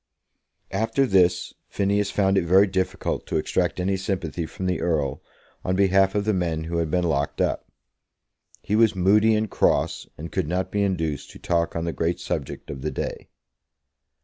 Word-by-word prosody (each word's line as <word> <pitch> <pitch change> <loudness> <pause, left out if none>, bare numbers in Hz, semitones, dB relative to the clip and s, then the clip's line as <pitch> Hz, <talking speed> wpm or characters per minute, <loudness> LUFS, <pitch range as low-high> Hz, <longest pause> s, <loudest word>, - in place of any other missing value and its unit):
After 115 +7 +1
this 95 -6 +2
Phineas 100 0 0
found 95 -1 +2
it 95 - +3
very 95 +4 +5
difficult 95 -1 -2
to - - -1
extract - - 0
any 95 +2 0
sympathy 90 -4 -3
from 95 - -6
the 90 -2 0
Earl 75 -6 0 0.4
on 90 - 0
behalf 95 0 +3
of 100 -1 0
the 110 - +2
men 85 -4 -1
who 85 +1 -3
had 85 -2 0
been 90 +3 +1
locked 75 -4 -1
up. - - -1 0.9
He 105 - 0
was 110 -2 +4
moody 105 +4 +4
and 110 0 0
cross, - - +1
and 80 +3 -7
could 95 -6 -1
not 90 +3 -2
be 105 - 0
induced 80 -7 -1
to - - -12
talk 85 -1 -1
on 85 0 -2
the 85 - -2
great 85 +1 -1
subject - - -4
of 70 -2 -7
the - - -1
day. - - -5
95 Hz, 180 wpm, -24 LUFS, 85-100 Hz, 0.9 s, very